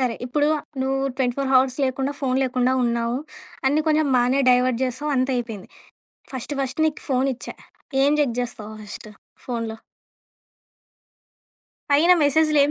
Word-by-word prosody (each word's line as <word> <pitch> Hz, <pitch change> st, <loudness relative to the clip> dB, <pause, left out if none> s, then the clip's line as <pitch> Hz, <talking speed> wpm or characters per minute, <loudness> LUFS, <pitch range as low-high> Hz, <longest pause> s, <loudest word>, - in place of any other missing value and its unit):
సరే. 245 Hz, -3 st, 0 dB
ఇప్పుడు 295 Hz, +4 st, +1 dB, 0.3 s
నువ్వు 270 Hz, 0 st, 0 dB, 0.2 s
24 265 Hz, +1 st, -1 dB
హవర్స్ 260 Hz, +1 st, +3 dB
లేకుండా 270 Hz, +2 st, -1 dB
ఫోను 260 Hz, -1 st, 0 dB
లేకుండా 255 Hz, 0 st, +1 dB
ఉన్నావు. 235 Hz, +1 st, 0 dB, 0.5 s
అన్నీ 295 Hz, +3 st, +3 dB
కొంచెం 310 Hz, -1 st, +3 dB
బానే 250 Hz, +3 st, +2 dB
డైవర్ట్ 250 Hz, 0 st, +2 dB
జేశావు 260 Hz, +4 st, -3 dB
అంత 255 Hz, +1 st, +1 dB
అయిపోయింది. 225 Hz, -5 st, -5 dB, 0.7 s
ఫస్ట్ 260 Hz, +3 st, -5 dB
ఫస్ట్ 265 Hz, +4 st, -3 dB
నీకు 305 Hz, -, -5 dB
ఫోను 265 Hz, +1 st, +2 dB
ఇచ్చా, -, -, -9 dB, 0.5 s
ఏం 285 Hz, -, +4 dB
జెక్ 250 Hz, -5 st, +1 dB
జేస్తావు 220 Hz, -3 st, -6 dB
ఫస్ట్ 210 Hz, +1 st, -9 dB, 0.4 s
ఫోన్‌లో? 230 Hz, -3 st, -3 dB, 2.2 s
పైన 320 Hz, +6 st, +6 dB
మెసేజు‌లేం 295 Hz, 0 st, +3 dB
260 Hz, 130 wpm, -23 LUFS, 245-285 Hz, 2.2 s, పైన